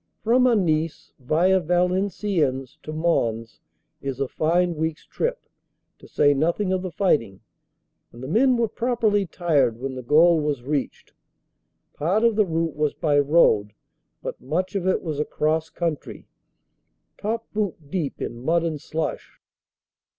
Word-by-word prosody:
From 250 +3 +4
Anice 165 -9 0
via 170 +8 +2
Valenciennes 180 - 0
to 155 - -7
Mons 120 -9 -1 0.4
is 135 -2 -4
a 135 - 0
fine 175 +5 +1
week 160 0 -2
s - - -23
trip, - - -3 0.5
to - - -15
say 145 -1 +3
nothing 170 +7 0
of 185 - 0
the 185 - -4
fighting, 145 - 0 0.7
and 120 +2 -11
the - - -5
men 245 - +3
were 235 -1 +2
properly 220 -4 0
tired 155 -9 +1
when 135 +1 -4
the 130 - -6
goal 160 +6 +5
was 145 -4 -2
reached. 140 0 -3 0.8
Part 185 +9 0
of 230 -2 +4
the 210 -2 +3
route 165 -1 -1
was 150 -1 0
by 145 -2 +2
road, 135 -9 +3 0.5
but - - -6
much 175 +8 -2
of 190 -2 -2
it 190 - +1
was 155 -4 -3
across 155 +1 0
country 165 -4 -4 0.9
top 225 +2 -2
boot 185 -9 -3
deep 165 -7 -3
in 120 - -6
mud 165 +4 +2
and 155 -4 -3
slush. 155 -1 -4
160 Hz, 150 wpm, -24 LUFS, 145-190 Hz, 0.9 s, goal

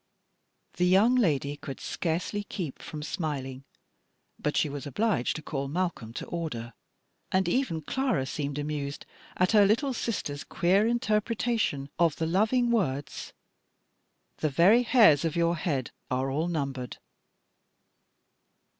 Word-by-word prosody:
The 180 0 +3
young 200 +7 +5
lady 145 - +1
could 140 -2 -8
scarcely 180 +5 -2
keep 170 -8 -6
from 150 -1 -7
smiling, 135 -3 -4 0.7
but 150 - -1
she - - +3
was 145 0 -6
obliged 145 - 0
to 155 - -6
call 140 -2 -3
Malcolm 165 -7 -2
to - - -5
order, 120 -10 -5 0.6
and 190 -1 +2
even 175 - 0
Clara 260 - 0
seemed 140 +1 -3
amused 145 -1 -4 0.3
at 180 0 +3
her 210 -2 +6
little 235 +7 +2
sister's 165 -12 -3
queer 195 +5 +2
interpretation 220 - 0
of 165 -4 +3
the 165 - -2
loving 220 +8 +2
words, 145 - -1 1.0
"The 155 - 0
very 180 - +5
hairs 220 - +5
of 165 -2 -1
your 170 0 +2
head 145 -7 -2 0.2
are 130 +1 0
all 155 +5 0
numbered." 135 -7 -3
165 Hz, 130 wpm, -28 LUFS, 140-205 Hz, 1.0 s, her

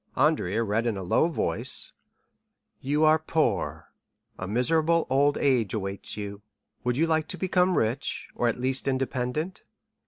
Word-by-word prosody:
Andrea 125 - +2
read 110 +2 0
in 110 -4 -1
a 95 - -5
low 90 - +3
voice: 170 - -3 0.9
"'You 145 +3 0
are 155 0 +5
poor; 160 0 -1 0.4
a 90 - -6
miserable 160 - +2
old 145 +2 +3
age 120 -8 +2
awaits 100 0 -3
you. 100 -1 -6 0.4
Would 125 0 0
you 160 - +3
like 160 -1 +1
to 185 - -5
become 185 -1 +2
rich, 120 +6 -1
or 120 - 0
at 120 - -1
least 130 +2 +1
independent? 135 +5 -2
130 Hz, 150 wpm, -27 LUFS, 115-155 Hz, 0.9 s, are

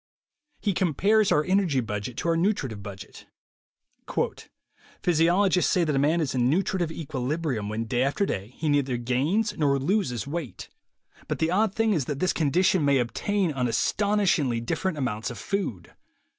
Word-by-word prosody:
He 205 - 0
compares 200 +5 +2
our 150 - +3
energy 185 -6 +2
budget 110 0 -4
to 170 - -1
our 165 - +3
nutritive 165 - -1
budget. 100 -1 -10 1.8
"Physiologists 175 +3 +3
say 180 - +3
that 150 -3 0
a - - +2
man 155 +4 +2
is 145 - -1
in 125 -1 +2
'nutri 190 +5 +1
tive 170 -2 -1
equilibrium' 140 -6 -3
when 110 +2 -3
day 120 +2 -1
after 140 +9 +1
day 105 - -5
he 160 - -2
neither 140 -4 +1
gains 140 - 0
nor 140 -2 +3
loses 135 - 0
weight. 150 -2 -6 0.6
But - - -2
the 160 +1 0
odd 205 +2 +1
thing 225 -1 +2
is 155 -8 0
that 145 0 -3
this 185 +5 +1
condition 175 +3 +2
may 140 -1 +3
obtain 175 - 0
on 125 -2 0
astonishingly 175 - +1
different 155 +9 -2
amounts 115 -5 -2
of 120 - -7
food. 120 - -4
150 Hz, 165 wpm, -26 LUFS, 125-185 Hz, 1.8 s, our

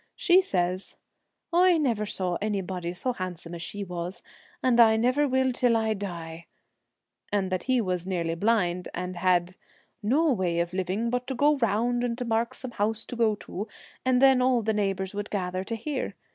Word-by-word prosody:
She 370 0 +5
says, 185 - -2 0.3
' - - -40
I 355 0 +5
never 230 -9 0
saw 185 -3 -1
anybody 190 -4 -2
so 250 +7 -2
handsome 175 -4 -6
as 170 - -6
she 205 +4 -5
was, 180 0 -5 0.4
and 245 -2 +3
I 220 -1 +7
never 255 +6 +2
will 260 0 +2
till 245 -2 +2
I 220 -1 +1
die,' 170 -5 -6 0.8
and 195 -2 0
that 185 - -2
he 255 -1 +4
was 180 -3 -2
nearly 170 -3 -1
blind, 180 -2 +1
and 180 0 -4
had 180 0 +1 0.2
' - - -35
no 280 +8 +3
way 180 -5 0
of 170 +1 -1
living 190 +5 -1
but 250 0 -2
to 265 - -3
go 290 +4 +4
round 240 +1 +1
and 235 -1 -1
to 250 - -3
mark 230 0 0
some 255 - -7
house 220 0 -1
to - - -7
go 225 -2 +2
to, 205 +4 -5 0.4
and 255 -1 +3
then 265 -1 +6
all 250 -2 +3
the 220 +1 +1
neighbours 195 -2 -1
would 205 0 -4
gather 185 -2 -2
to 230 - -3
hear. 255 -3 -4
210 Hz, 195 wpm, -27 LUFS, 185-245 Hz, 0.8 s, I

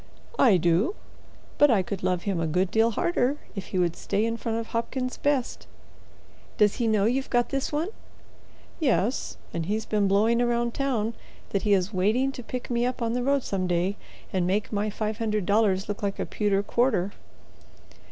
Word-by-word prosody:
"I 220 -8 +6
do, 175 - +2 0.6
but 290 - +7
I 210 -6 +3
could 195 +1 -5
love 180 -1 0
him 195 -4 -1
a 165 - 0
good 180 +4 +1
deal 225 +1 +4
harder 270 +3 0 0.2
if 195 - -6
he 190 - -3
would 175 -2 +1
stay 205 +2 -1
in 230 0 -1
front 230 -1 -3
of 230 -1 -4
Hopkins's 255 +2 -3
best." 280 -4 -1 0.9
"Does 210 -1 +3
he 235 - +1
know 215 -2 +3
you've 260 +4 0
got 240 -1 +2
this 275 0 -2
one?" 310 +5 -1 0.9
"Yes, 255 - 0 0.2
and 165 -1 -3
he's 215 +2 -1
been 210 -2 +1
blowing 215 +4 +3
round 240 -1 +1
town 235 -5 -1 0.4
that 200 - 0
he 210 - +2
is 190 +2 -1
waiting 220 +9 +2
to 260 - -8
pick 250 +1 -6
me 235 0 +1
up 250 +2 -1
on 230 0 0
the 250 - 0
road 275 +1 +1
some 185 -2 -2
day 180 +3 0 0.4
and 180 -2 +1
make 205 +4 -1
my 210 +1 0
five 215 +1 -3
hundred 215 -4 0
dollars 200 -2 +2
look 205 0 -4
like 200 -1 -2
a - - -2
pewter 200 -2 0
quarter." 205 -5 +1
215 Hz, 190 wpm, -26 LUFS, 195-245 Hz, 0.9 s, but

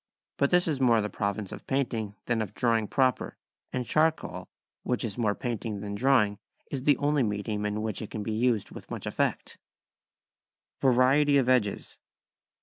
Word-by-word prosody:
But 140 - +2
this 180 0 +3
is 145 -4 -1
more 120 -3 +5
the 105 -1 -2
province 100 0 -3
of - - -9
painting 115 -6 -1
than 115 -2 0
of 105 -1 -5
drawing 115 -3 +1
proper, 130 0 0 0.3
and 125 -1 -2
charcoal, 155 - 0 0.3
which 125 - -1
is 110 -4 -3
more 105 -4 0
painting 115 -5 -4
than 100 -1 -5
drawing, 105 -3 +2 0.3
is 135 -1 -4
the 145 -3 +5
only 145 0 +1
medium 105 -1 -1
in 105 +1 -2
which 110 -3 -3
it 110 - -6
can 110 - -5
be 110 - -3
used 115 -1 +1
with - - -11
much - - -6
effect. - - -2 1.2
[Sidenote: 130 -2 +4
Variety 140 +3 +4
of 130 -3 +2
Edges. 125 -6 0
115 Hz, 175 wpm, -28 LUFS, 105-135 Hz, 1.2 s, more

